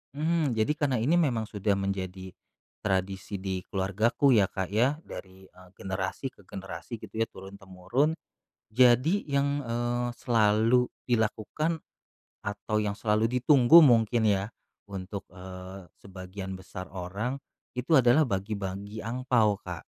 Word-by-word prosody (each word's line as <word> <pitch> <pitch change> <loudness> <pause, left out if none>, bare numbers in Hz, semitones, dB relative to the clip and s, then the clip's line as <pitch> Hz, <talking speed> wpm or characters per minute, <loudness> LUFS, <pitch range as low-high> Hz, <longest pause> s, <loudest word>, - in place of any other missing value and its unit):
Mhm, 155 -4 +1
jadi 110 +6 +1
karena 140 -4 +1
ini 170 +7 +3
memang 125 -9 +1
sudah 105 -1 -1
menjadi 95 -1 -4 0.5
tradisi 95 0 -2
di 95 -1 -3
keluargaku 105 +8 +1
ya 105 -5 +5
Kak 95 -1 -4
ya, 125 +7 +2
dari, 95 0 -10
eee, 90 0 -18
generasi 95 +7 -4
ke 100 - -22
generasi 95 +5 -7
gitu 105 -3 -10
ya, 115 - +2
turun-temurun. 95 - -2 0.6
Jadi 130 - +4
yang, 140 +1 +1
eee, 120 +1 -1
selalu 115 +1 +3 0.2
dilakukan 120 +8 -1 0.6
atau 105 +1 -3
yang 105 -1 -1
selalu 105 +1 +1
ditunggu 135 +4 +7
mungkin 120 -4 +4
ya, 100 0 +1 0.4
untuk, 100 0 -6
eee, 95 0 -10
sebagian 95 0 -8
besar 95 0 -8
orang, 100 +9 -4 0.3
itu 125 +5 -5
adalah 125 +4 +5
bagi-bagi 100 +1 -4
angpao, 115 -4 +1
Kak. 90 -5 -7
105 Hz, 125 wpm, -28 LUFS, 95-125 Hz, 0.6 s, ditunggu